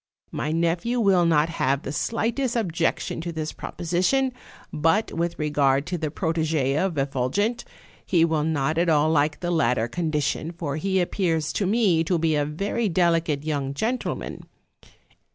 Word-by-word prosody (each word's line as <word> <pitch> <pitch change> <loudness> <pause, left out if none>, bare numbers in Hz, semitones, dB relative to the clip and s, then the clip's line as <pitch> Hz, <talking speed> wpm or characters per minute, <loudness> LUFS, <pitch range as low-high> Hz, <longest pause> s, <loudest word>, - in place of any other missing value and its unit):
My 150 - -2
nephew 170 +9 0
will 190 -6 +4
not 155 -1 +3
have 140 -4 0
the - - -4
slightest 235 - -1
objection 170 -6 -1
to 170 +1 -4
this 155 -1 -4
proposition; 185 +10 0 0.4
but 165 +8 +1
with 170 +1 -2
regard 145 -2 +1
to 175 +1 -3
the 155 - -2
protege 160 -4 0
of 175 0 0
Effulgent, 140 - 0 0.4
he 170 -3 +3
will 160 -2 0
not 155 0 0
at 170 0 +2
all 155 0 +3
like 150 0 +1
the 175 -1 -1
latter 125 -9 +2
condition, 155 +2 -2
for 155 -4 -4
he 190 +3 0
appears 165 -4 0
to 195 - 0
me 195 -6 +3
to 175 +1 +1
be 160 -1 +1
a 145 -1 +1
very 200 +9 -1
delicate 165 -4 +1
young 140 -3 -2
gentleman. 235 - -3
165 Hz, 155 wpm, -24 LUFS, 150-185 Hz, 0.4 s, will